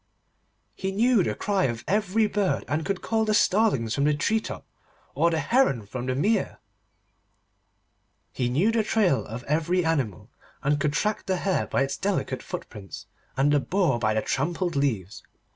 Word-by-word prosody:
He 190 Hz, -, -3 dB
knew 230 Hz, +2 st, +3 dB
the -, -, -1 dB
cry 200 Hz, -2 st, 0 dB
of 120 Hz, -3 st, -3 dB
every 210 Hz, +2 st, +2 dB
bird, 205 Hz, -2 st, 0 dB
and 155 Hz, +2 st, -1 dB
could 195 Hz, +1 st, -3 dB
call 225 Hz, -1 st, +1 dB
the 215 Hz, -1 st, +1 dB
starlings 185 Hz, -, +2 dB
from 140 Hz, -, +1 dB
the 150 Hz, 0 st, +3 dB
tree 215 Hz, +9 st, +1 dB
top, -, -, -7 dB, 0.5 s
or 170 Hz, -, +3 dB
the 165 Hz, -, 0 dB
heron 160 Hz, -, +2 dB
from 125 Hz, +4 st, -6 dB
the 130 Hz, -, 0 dB
mere. 200 Hz, -, 0 dB, 1.8 s
He 125 Hz, -1 st, -1 dB
knew 165 Hz, -, +2 dB
the 225 Hz, 0 st, +2 dB
trail 205 Hz, -9 st, +2 dB
of 115 Hz, +3 st, -7 dB
every 165 Hz, +5 st, 0 dB
animal, 135 Hz, -, -1 dB, 0.3 s
and 145 Hz, +1 st, +1 dB
could 145 Hz, 0 st, 0 dB
track 210 Hz, +6 st, -1 dB
the 190 Hz, -1 st, +1 dB
hare 190 Hz, +1 st, 0 dB
by 140 Hz, -, +1 dB
its 135 Hz, 0 st, -3 dB
delicate 190 Hz, -9 st, -2 dB
footprints, 100 Hz, -4 st, -8 dB, 0.3 s
and 140 Hz, +2 st, +3 dB
the 145 Hz, -, +4 dB
boar 170 Hz, -5 st, +1 dB
by 110 Hz, -1 st, +1 dB
the 110 Hz, -, 0 dB
trampled 170 Hz, +5 st, -1 dB
leaves. 110 Hz, -10 st, -1 dB
165 Hz, 175 wpm, -26 LUFS, 130-205 Hz, 1.8 s, the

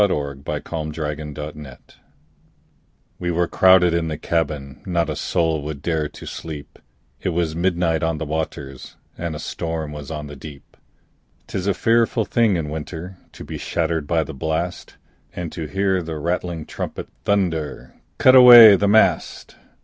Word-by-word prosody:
W 100 Hz, -5 st, +3 dB
X. 70 Hz, 0 st, -13 dB
Y 75 Hz, -, -1 dB
Z 75 Hz, -, -9 dB
Ballad 80 Hz, -2 st, -5 dB
of 75 Hz, -1 st, -4 dB
the 75 Hz, 0 st, -5 dB
Tempest 70 Hz, -4 st, -13 dB, 1.2 s
WE 90 Hz, -, -2 dB
were 85 Hz, 0 st, +1 dB
crowded 95 Hz, -2 st, +5 dB
in 85 Hz, -1 st, 0 dB
the 80 Hz, -1 st, -4 dB
cabin, 75 Hz, -4 st, -3 dB
Not 85 Hz, -4 st, -1 dB
a -, -, -4 dB
soul 80 Hz, -1 st, 0 dB
would 75 Hz, -1 st, -7 dB
dare 80 Hz, -2 st, -1 dB
to -, -, -12 dB
sleep, 75 Hz, -3 st, -8 dB, 0.4 s
It 95 Hz, -, -1 dB
was 85 Hz, -2 st, -1 dB
midnight 85 Hz, -2 st, 0 dB
on 80 Hz, -1 st, -1 dB
the 80 Hz, -, -4 dB
waters, 75 Hz, -3 st, -5 dB, 0.2 s
And 85 Hz, -2 st, -4 dB
a -, -, -6 dB
storm 80 Hz, -1 st, -4 dB
was 75 Hz, -2 st, -8 dB
on 75 Hz, -2 st, -5 dB
the 75 Hz, 0 st, -9 dB
deep. 70 Hz, 0 st, -12 dB, 0.7 s
'Tis 95 Hz, 0 st, -4 dB
a 100 Hz, -, +1 dB
fearful 115 Hz, 0 st, +2 dB
thing 115 Hz, -5 st, +2 dB
in 80 Hz, -3 st, -3 dB
winter 80 Hz, +4 st, -7 dB, 0.2 s
To -, -, -10 dB
be -, -, -7 dB
shattered 80 Hz, -3 st, -2 dB
by 80 Hz, 0 st, +1 dB
the 80 Hz, -, -8 dB
blast, 80 Hz, +5 st, -3 dB, 0.4 s
And 85 Hz, -3 st, -5 dB
to 80 Hz, -3 st, -5 dB
hear 95 Hz, +1 st, 0 dB
the 80 Hz, -2 st, -5 dB
rattling 85 Hz, 0 st, -3 dB
trumpet -, -, -6 dB, 0.2 s
Thunder, 85 Hz, -7 st, -1 dB, 0.2 s
"Cut 130 Hz, -, +6 dB
away 120 Hz, -4 st, +11 dB
the 100 Hz, +1 st, +1 dB
mast!" 110 Hz, +2 st, +2 dB
80 Hz, 170 wpm, -21 LUFS, 75-90 Hz, 1.2 s, away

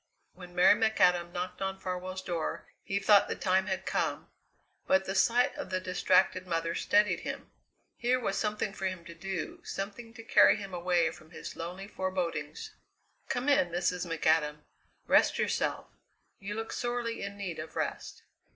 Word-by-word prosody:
When 180 Hz, -1 st, -12 dB
Mary 180 Hz, +3 st, +7 dB
McAdam 180 Hz, -6 st, +3 dB
knocked 180 Hz, +1 st, -5 dB
on 190 Hz, 0 st, -2 dB
Farwell's 185 Hz, +1 st, -4 dB
door 170 Hz, -3 st, -3 dB
he 195 Hz, -, -2 dB
thought 200 Hz, 0 st, +5 dB
the -, -, -2 dB
time 190 Hz, 0 st, +1 dB
had 190 Hz, -1 st, -2 dB
come, -, -, -2 dB, 0.6 s
but 190 Hz, 0 st, +3 dB
the 190 Hz, -, -2 dB
sight 235 Hz, +5 st, +3 dB
of -, -, -6 dB
the 185 Hz, -, 0 dB
distracted 185 Hz, 0 st, +2 dB
mother 165 Hz, -1 st, -1 dB
steadied 205 Hz, -3 st, +2 dB
him. -, -, -6 dB, 0.5 s
Here 250 Hz, +2 st, +2 dB
was 245 Hz, -, -1 dB
something 210 Hz, -2 st, -1 dB
for 190 Hz, -2 st, -2 dB
him 185 Hz, -3 st, -5 dB
to 170 Hz, -, -9 dB
do, 180 Hz, 0 st, -5 dB
something 210 Hz, +4 st, -6 dB
to 225 Hz, -, -9 dB
carry -, -, +6 dB
him 195 Hz, -3 st, -7 dB
away 175 Hz, -2 st, +2 dB
from 155 Hz, -1 st, -15 dB
his 165 Hz, -, -8 dB
lonely 180 Hz, +4 st, -6 dB
forebodings. 175 Hz, -7 st, -3 dB, 0.6 s
"Come 245 Hz, +3 st, -1 dB
in, 275 Hz, -12 st, +4 dB
Mrs. 175 Hz, +1 st, -1 dB
McAdam. 155 Hz, -2 st, +1 dB, 0.4 s
Rest -, -, +4 dB
yourself. -, -, 0 dB, 0.5 s
You 205 Hz, +1 st, -5 dB
look 225 Hz, +1 st, -4 dB
sorely 240 Hz, -1 st, -2 dB
in 200 Hz, 0 st, -5 dB
need 185 Hz, -6 st, -5 dB
of 155 Hz, -, -7 dB
rest." -, -, -4 dB
185 Hz, 165 wpm, -30 LUFS, 175-205 Hz, 0.6 s, Mary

